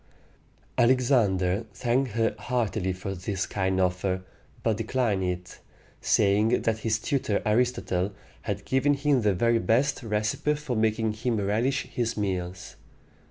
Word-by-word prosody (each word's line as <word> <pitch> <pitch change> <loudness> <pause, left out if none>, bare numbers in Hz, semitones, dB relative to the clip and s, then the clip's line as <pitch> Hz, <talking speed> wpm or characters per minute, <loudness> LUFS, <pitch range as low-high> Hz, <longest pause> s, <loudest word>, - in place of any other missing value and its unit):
Alexander 115 -6 +3
thanked 125 -1 0
her 115 0 +1
heartily 110 -6 -1
for 95 +1 -5
this 95 +1 -3
kind 95 -1 -1
offer, 90 0 0 0.4
but 110 -3 +1
declined 115 -3 0
it, 90 0 -4 0.4
saying 105 +4 +3
that 110 -1 0
his 110 0 0
tutor 115 -4 0
Aristotle 105 -5 +1 0.3
had 100 -2 -4
given 140 +2 +2
him 140 -2 +2
the 105 -3 +2
very 115 +4 +2
best 130 +7 +1
recipe 110 +6 0
for 145 -4 -4
making 110 0 +1
him 115 +1 -1
relish 115 +7 0
his 120 -2 -3
meals. 95 -3 -3
110 Hz, 130 wpm, -27 LUFS, 95-125 Hz, 0.4 s, Alexander